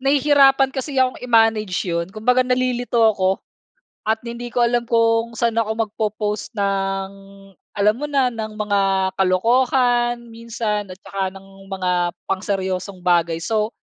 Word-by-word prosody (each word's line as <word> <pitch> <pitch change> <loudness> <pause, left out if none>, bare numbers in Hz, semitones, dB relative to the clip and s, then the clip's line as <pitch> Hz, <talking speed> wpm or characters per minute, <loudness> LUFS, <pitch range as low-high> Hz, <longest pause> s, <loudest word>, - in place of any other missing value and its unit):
nahihirapan 275 -1 +4
kasi 270 +1 -4
akong 255 -1 +1
i-manage 225 -6 +2
'yon. 170 -1 -2
Kumbaga 220 +6 +1
nalilito 250 -3 +2
ko 190 -1 +1 0.7
at 220 +1 0
hindi 235 +1 -6
ko 245 - -3
alam 240 0 +1
kung 230 0 +1
saan 235 -1 +1
ako 220 -1 +1 0.2
magpo-post 210 0 -3
ng, 195 -1 -1 0.7
alam 210 +1 +4
mo 290 +6 -4
na, 270 -3 +2
ng 220 -1 -4
mga 205 -1 +1 0.3
kalokohan, 240 +5 +2
minsan 225 -3 -4
at 185 - -10
'tsaka 195 -1 -4
ng 195 0 -14 0.2
mga 185 -1 -2 0.4
pang 190 0 -2
seryosong 190 -1 -3
bagay. 170 -2 +1
So, 215 +5 -1
220 Hz, 140 wpm, -20 LUFS, 195-245 Hz, 0.7 s, nahihirapan